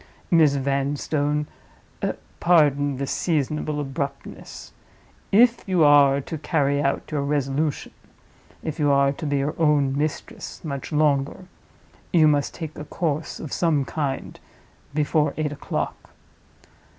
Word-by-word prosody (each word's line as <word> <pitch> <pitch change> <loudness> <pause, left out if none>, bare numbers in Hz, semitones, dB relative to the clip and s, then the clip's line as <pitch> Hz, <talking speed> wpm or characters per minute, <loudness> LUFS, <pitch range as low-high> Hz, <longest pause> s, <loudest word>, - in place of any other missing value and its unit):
Miss 155 -4 +5
Vanstone, 145 +2 0 0.9
pardon 145 -5 +3
this 135 0 -3
seasonable 150 -2 -1
abruptness! 140 0 -6 0.6
If 230 +3 +5
you 180 -4 +3
are 140 -2 +6
to 155 +3 -6
carry 145 -2 +1
out 140 -1 -1
your 150 -2 0
resolution—if 145 +2 -4
you 145 -1 +3
are 140 0 +4
to 145 - -6
be 145 0 +1
your 140 +2 -1
own 145 -4 +3
mistress 150 +1 -4
much 140 -1 -5
longer, 150 +2 +1 0.7
you 160 -3 +5
must 145 -2 +1
take 160 -3 -7
a 150 - -6
course 155 -1 -3
of 155 - -6
some 155 -5 +1
kind 140 -3 -4 0.6
before 150 0 +1
eight 155 -2 -1
o'clock. 145 - -4
145 Hz, 120 wpm, -24 LUFS, 140-155 Hz, 0.9 s, are